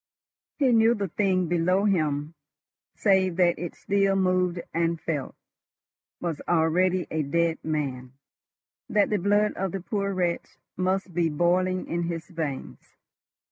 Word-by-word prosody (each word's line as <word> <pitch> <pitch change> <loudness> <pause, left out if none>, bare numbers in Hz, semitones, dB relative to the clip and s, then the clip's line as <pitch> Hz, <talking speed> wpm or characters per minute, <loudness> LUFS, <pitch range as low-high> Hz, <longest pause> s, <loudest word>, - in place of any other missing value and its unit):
He 270 -4 +3
knew 230 0 +5
the 200 -3 -3
thing 185 -1 +1
below 180 +4 +2
him, 155 -5 0 0.6
save 190 -3 +2
that 175 -1 +3
it 175 -1 -5
still 195 -1 +1
moved 185 -2 +1
and 165 0 0
felt, 150 -4 -3 0.8
was 165 -4 -3
already 175 +2 +2
a 160 - 0
dead 165 +3 0
man—that 140 +7 -4
the 210 - +2
blood 205 +3 +2
of 190 -2 -3
the 195 - -2
poor 200 0 -2
wretch 180 -3 -2 0.2
must 185 0 -1
be 170 -1 +1
boiling 180 +4 +1
in 170 0 -2
his 170 -1 -4
veins. 155 -6 -6
175 Hz, 135 wpm, -26 LUFS, 165-195 Hz, 0.8 s, knew